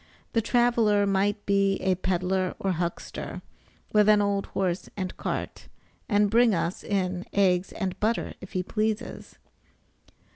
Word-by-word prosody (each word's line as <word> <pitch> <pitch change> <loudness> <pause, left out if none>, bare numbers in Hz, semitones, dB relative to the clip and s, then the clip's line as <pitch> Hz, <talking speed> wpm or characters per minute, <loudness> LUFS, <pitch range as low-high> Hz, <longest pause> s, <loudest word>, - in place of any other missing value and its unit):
The 230 - +3
traveler 230 -3 +3
might 200 +1 0
be 200 -1 +3
a 190 -1 +1
peddler 185 0 -1
or 195 - -1
huckster, 170 0 -4 0.5
with 210 0 +5
an 210 -1 +6
old 200 -1 0
horse 185 -2 -2
and 185 -2 -3
cart, - - -4 0.4
and 205 -2 +3
bring 230 -2 +5
us 170 +2 -2
in 185 -3 -1
eggs 185 -2 +2
and 190 -3 -3
butter 225 +2 0
if 190 - -11
he 185 - 0
pleases. 215 +4 -3
200 Hz, 140 wpm, -27 LUFS, 185-210 Hz, 0.5 s, an